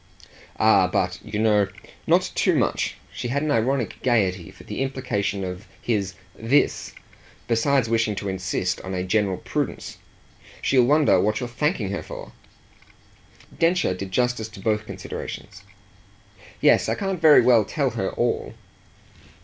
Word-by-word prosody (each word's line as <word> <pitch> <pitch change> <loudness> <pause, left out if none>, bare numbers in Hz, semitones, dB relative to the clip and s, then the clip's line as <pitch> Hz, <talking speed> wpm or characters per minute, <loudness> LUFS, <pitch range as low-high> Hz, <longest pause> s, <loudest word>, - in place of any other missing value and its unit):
"Ah 100 -4 +5
but, 90 -1 -1
you 105 - -5
know, 105 -2 +3 0.4
not - - +3
too - - +2
much!" - - 0 0.2
She - - -4
had 140 +4 -1
an 155 - 0
ironic 125 +1 0
gaiety 95 -8 +1
for - - -15
the - - -5
implications 115 -7 -2
of 90 +3 -7
his 100 -5 -1 0.2
"this," 120 +6 +1 0.5
besides 125 +3 +2
wishing 110 -2 +1
to 100 - -4
insist 95 -1 -2
on 95 0 -5
a 90 - -1
general 95 0 +1
prudence. - - -4 0.6
"She'll 130 -3 +3
wonder 145 -6 +4
what 105 +3 +1
you're 125 - -3
thanking 120 - -1
her 100 - -3
for!" - - -9 1.2
Densher 165 - +2
did 95 +1 -6
justice 125 +1 0
to 105 - -12
both 105 +1 -1
considerations. - - -7 1.0
"Yes, - - +4
I - - +1
can't 195 -3 -3
very 155 -2 +7
well 120 -3 +5
tell 135 +4 -1
her 95 -4 -2
all." 120 0 -2
110 Hz, 145 wpm, -24 LUFS, 95-130 Hz, 1.2 s, very